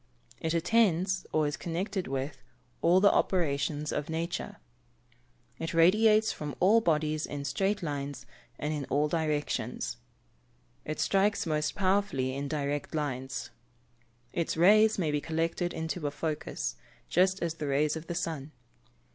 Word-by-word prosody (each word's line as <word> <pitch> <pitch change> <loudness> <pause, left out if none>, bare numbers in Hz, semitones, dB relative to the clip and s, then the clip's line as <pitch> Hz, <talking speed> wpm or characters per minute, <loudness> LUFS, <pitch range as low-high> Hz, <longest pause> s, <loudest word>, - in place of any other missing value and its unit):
It 160 +1 -1
attends, 185 -1 +2
or 155 -1 +2
is 145 +1 -1
connected 185 +3 -3
with, 135 0 -4 0.4
all 175 +2 +5
the 200 +1 +6
operations 150 -3 0
of 145 +1 -3
nature. 165 +2 -3 1.0
It 165 +1 -3
radiates 215 +6 +5
from 150 -2 -5
all 210 +5 +5
bodies 155 -4 +1
in 145 -1 -5
straight 195 +7 0
lines, 145 -2 -4 0.3
and 150 +1 -2
in 145 -2 -3
all 145 +3 +1
directions. 150 -7 -2 0.9
It 155 - -4
strikes 200 +1 +2
most 155 -1 -1
powerfully 190 -10 +1
in 140 +1 -3
direct 145 +1 -2
lines. 130 -4 -3 0.8
Its 170 -1 -1
rays 215 +5 +6
may 165 -6 0
be 150 0 0
collected 165 +2 -1
into 160 -1 -3
a - - +1
focus, 150 - -3 0.3
just 185 +2 +3
as 170 -2 -1
the 155 -3 -5
rays 145 +2 +2
of 160 +1 -7
the 170 - -3
sun. 160 -4 -3
160 Hz, 140 wpm, -30 LUFS, 145-185 Hz, 1.0 s, the